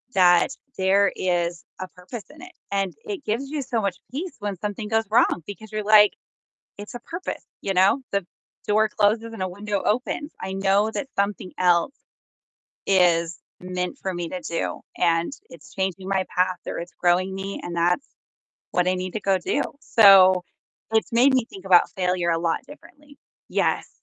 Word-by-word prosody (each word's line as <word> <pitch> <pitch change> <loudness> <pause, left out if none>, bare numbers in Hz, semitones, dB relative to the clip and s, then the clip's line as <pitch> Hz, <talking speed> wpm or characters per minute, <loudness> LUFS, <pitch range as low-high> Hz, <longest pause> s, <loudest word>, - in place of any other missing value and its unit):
that 175 +1 +5 0.3
there 195 +1 +3
is 175 -1 -1 0.2
a 185 - -5
purpose 185 +5 -10
in 300 +2 -15
it, 360 0 -12 0.2
and 195 -1 -1
it 400 -8 -5
gives 235 +6 -2
you 300 -1 -3
so 235 -4 -1
much 195 -3 -2
peace 330 +8 -5
when 205 -2 -4
something 210 +3 -4
goes 225 0 +1
wrong 215 -6 +3
because 215 +1 -9
you're 215 -1 -3
like, 210 0 +6 0.6
"It's 205 0 -9
a - - -5
purpose," 340 +9 -6 0.2
you 195 - -1
know? 190 +9 +4
The 200 -2 -1 0.4
door 215 +1 +3
closes 220 +2 +1
and 190 - -4
a 185 - -2
window 205 +1 -3
opens. 255 +6 -1
I 190 0 -5
know 195 +2 +2
that 275 - -4
something 200 -2 -1
else 175 +7 +3 0.9
is 175 -3 +3 0.2
meant 180 0 -4
for 190 -1 -3
me 175 -1 -4
to 185 - -5
do, 170 - -3 0.2
and 170 +4 +2 0.2
it's - - -14
changing 190 -1 -3
my 190 -1 0
path 180 0 +2
or - - -4
it's 175 +1 -8
growing 180 +2 +2
me, 195 +1 -5
and 175 - -5
that's 175 - +1 0.7
what 180 0 +2
I 185 - +2
need 185 0 -4
to 215 - -2
go 195 -1 +2
do. - - 0 0.2
So 190 -4 +6 0.5
it's 220 +1 +1
made 250 +4 +5
me 255 - +2
think 195 -4 -12
about 185 -2 +5
failure 180 -2 0
a 165 - +1
lot 165 0 0
differently. 295 -1 -16 0.3
Yes. - - 0
195 Hz, 180 wpm, -24 LUFS, 180-220 Hz, 0.9 s, like